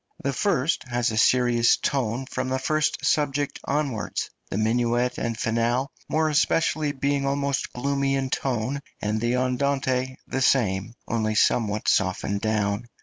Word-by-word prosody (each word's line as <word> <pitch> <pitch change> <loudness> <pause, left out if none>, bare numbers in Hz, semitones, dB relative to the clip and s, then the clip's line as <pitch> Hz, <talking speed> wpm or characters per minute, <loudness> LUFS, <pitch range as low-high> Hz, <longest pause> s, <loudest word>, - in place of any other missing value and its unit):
The 140 - 0
first 150 -1 +1
has 120 -1 0
a - - -3
serious 120 0 +4
tone 130 -2 -1
from 130 0 -3
the 130 - 0
first 155 +3 0
subject 145 -1 0
onwards, 140 -6 -2 0.2
the - - -3
minuet 120 +3 +1
and 115 -1 -2
finale 120 +3 0 0.2
more 155 0 +2
especially 155 0 +2
being 140 0 0
almost 140 0 -1
gloomy 140 +1 0
in 135 -1 -2
tone, 130 +2 -1 0.2
and 105 +1 -1
the 120 +1 +1
andante 130 0 0
the 135 - -3
same, 110 -4 +2
only 110 -1 0
somewhat 105 -1 +2
softened 95 +1 +1
down. 105 +1 0
125 Hz, 145 wpm, -25 LUFS, 115-140 Hz, 0.2 s, serious